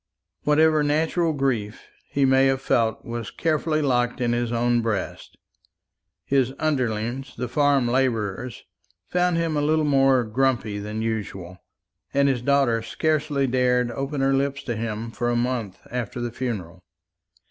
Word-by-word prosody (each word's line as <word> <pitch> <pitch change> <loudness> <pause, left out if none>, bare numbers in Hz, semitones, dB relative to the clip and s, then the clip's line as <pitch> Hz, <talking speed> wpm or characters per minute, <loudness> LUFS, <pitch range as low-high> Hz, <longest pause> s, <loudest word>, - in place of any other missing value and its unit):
Whatever 155 +1 +4
natural 160 +3 +1
grief 125 -7 -2 0.3
he 140 -1 +2
may 135 0 +4
have 135 0 +1
felt 115 -4 0
was 115 -2 -5
carefully 155 -1 0
locked 125 -3 +1
in 120 -1 +1
his 120 -1 -1
own 120 0 +2
breast. 110 -5 -4 0.9
His 135 -2 +1
underlings, 130 -3 -2
the 125 +1 -3
farm 140 -1 +2
labourers, 120 -2 -1 0.5
found 180 -1 +1
him 165 -2 0
a 145 - +1
little 155 +1 +2
more 135 -3 +4
"grumpy" 115 -2 0
than 105 +2 -4
usual, 95 -5 -4 0.6
and 140 0 +4
his 130 -3 +1
daughter 135 -3 +2
scarcely 145 +3 0
dared 125 -1 +1
open 135 +3 -3
her 135 0 +3
lips 140 +1 0
to 120 - -3
him 110 +1 -4
for 120 +1 -2
a 120 - +1
month 120 -5 -1
after 120 0 -4
the 120 0 -3
funeral. 100 -9 -5
125 Hz, 145 wpm, -24 LUFS, 115-140 Hz, 0.9 s, Whatever